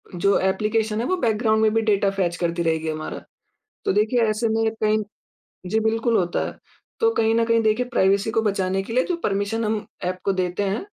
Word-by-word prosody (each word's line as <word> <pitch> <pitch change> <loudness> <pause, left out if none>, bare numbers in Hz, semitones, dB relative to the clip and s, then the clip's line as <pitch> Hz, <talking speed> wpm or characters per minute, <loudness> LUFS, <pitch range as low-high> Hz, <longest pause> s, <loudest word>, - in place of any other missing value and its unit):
जो 200 +3 +2
ऐप्लीकेशन 215 +3 0
है, - - -2
वो 370 - +1
बैकग्राउंड 220 -4 +1
में 215 0 +3
भी 225 - +2
डेटा 205 -2 +2
फेच 180 -3 -1
करती 170 0 -1
रहेगी 160 -1 0
हमारा। 155 0 -5 0.6
तो - - +2
देखिए, 220 +4 +2
ऐसे 220 +2 0
में 220 0 +1
कहीं 215 0 +3 0.7
जी, 220 +4 +1
बिल्कुल 225 +1 +1
होता 175 -2 0
है। - - -8 0.4
तो 455 0 +4
कहीं 225 0 +2
न 230 0 +3
कहीं 230 0 +2
देखिए, 220 +3 +1
प्राइवेसी 200 -1 +2
को 225 - +1
बचाने 195 -2 0
के 225 - -8
लिए 255 +2 +2
जो 355 - -2
परमिशन 205 +3 -1
हम 215 0 -2 0.2
ऐप 185 +1 -2
को 195 - +2
देते 185 +1 -1
हैं, 200 - -2
215 Hz, 205 wpm, -23 LUFS, 190-225 Hz, 0.7 s, तो